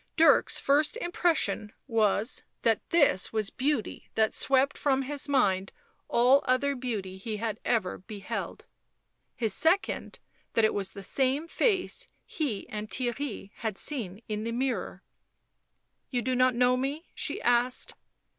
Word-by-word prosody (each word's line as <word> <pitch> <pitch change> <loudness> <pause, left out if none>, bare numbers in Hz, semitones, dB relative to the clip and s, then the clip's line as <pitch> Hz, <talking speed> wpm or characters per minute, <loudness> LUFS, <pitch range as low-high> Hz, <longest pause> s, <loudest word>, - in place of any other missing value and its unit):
Dirk's 325 0 +5
first 295 +8 +2
impression 330 - 0
was, 220 -1 +1 0.2
that 225 -2 +3
this 285 - +3
was 215 -2 -1
beauty 265 -4 -2
that 220 -1 +2
swept 270 +1 +2
from 270 -2 +1
his 285 +1 -2
mind 195 -9 +2 0.4
all 255 +4 +5
other 275 +3 +2
beauty 215 -7 -4
he 215 +2 -4
had 220 0 -3
ever 225 -7 0
beheld; 210 +3 -6 0.7
his 220 -4 0
second, 335 - +1 0.4
that 225 - +5
it - - +2
was 195 -2 -1
the 200 - -8
same 270 - 0
face 380 +1 0 0.2
he 270 - -3
and 215 0 -5
Theirry 245 -4 -3
had 220 -4 -3
seen 225 -7 -3
in 215 0 -3
the 230 - -2
mirror. 255 +2 -2 0.5
" - - -49
You 245 -2 -1
do 260 +2 0
not 255 0 +3
know 250 +1 +4
me 275 +6 -3
?" - - -39
she - - -2
asked. 245 +1 +1
245 Hz, 145 wpm, -28 LUFS, 215-275 Hz, 0.7 s, Dirk's